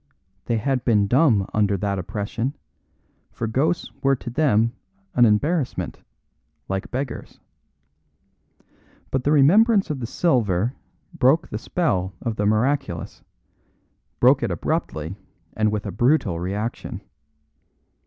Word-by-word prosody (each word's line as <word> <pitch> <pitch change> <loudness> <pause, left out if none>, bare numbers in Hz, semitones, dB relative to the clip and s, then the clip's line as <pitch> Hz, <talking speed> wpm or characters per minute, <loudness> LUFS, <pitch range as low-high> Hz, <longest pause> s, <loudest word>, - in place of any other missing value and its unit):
They 115 - 0
had 130 +2 -1
been 105 -4 +3
dumb 120 -3 +3
under 105 -2 +2
that 100 0 -1
oppression, 110 - -3 0.8
for 115 - -4
ghosts 145 +10 0
were 135 0 +3
to 120 -1 -7
them 115 -5 +2 0.4
an 120 - +5
embarrassment, 135 +7 0 0.7
like 95 0 -3
beggars. 130 +1 -5 1.7
But 130 -1 -1
the 145 - +3
remembrance 195 - +5
of 145 - -3
the 120 - -4
silver 120 - +1 0.4
broke 155 0 +3
the 105 - -4
spell 95 - -1
of 115 -2 -3
the 105 -1 0
miraculous; 110 - -1 1.0
broke 130 +3 +5
it 120 - 0
abruptly 80 0 -3 0.4
and 110 -1 +2
with 105 0 -3
a 100 - -3
brutal 120 - +2
reaction. 100 +6 -4
115 Hz, 120 wpm, -23 LUFS, 105-140 Hz, 1.7 s, an